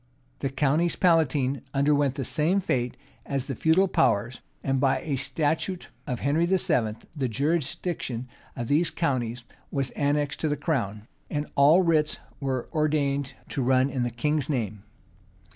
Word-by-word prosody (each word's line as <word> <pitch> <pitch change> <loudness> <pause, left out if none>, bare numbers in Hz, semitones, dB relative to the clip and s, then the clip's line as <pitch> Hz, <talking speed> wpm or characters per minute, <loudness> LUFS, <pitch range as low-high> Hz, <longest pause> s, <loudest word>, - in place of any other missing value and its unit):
The 135 - -1
counties 150 +5 +1
palatine 140 -7 +2
underwent 140 -1 +3
the 135 -3 -3
same 165 +6 +1
fate 125 -9 -1 0.3
as 135 -2 -2
the 135 - -3
feudal 160 - +3
powers; 120 - +1 0.2
and, 135 -1 +1
by 135 0 +2
a 145 -4 -2
statute 160 +6 -1 0.2
of 125 -4 -3
Henry 155 +5 +2
VIII.,[*] 155 - +2 0.2
the 135 -4 -1
jurisdiction 140 -1 -2 0.3
of 120 -3 -4
these 155 +5 +3
counties 125 -7 -1 0.3
was 135 -2 -1
annexed 145 0 0
to 155 - 0
the 145 - 0
crown, 115 - -2 0.2
and 145 0 -2
all 150 +7 +6
writs 155 -3 +2 0.2
were 130 -3 -2
ordained 145 -3 0
to 140 - -2
run 130 +2 +3
in 130 -1 -2
the 120 - +1
king's 150 +5 -1
name. 110 -7 -2
140 Hz, 150 wpm, -26 LUFS, 130-155 Hz, 0.3 s, all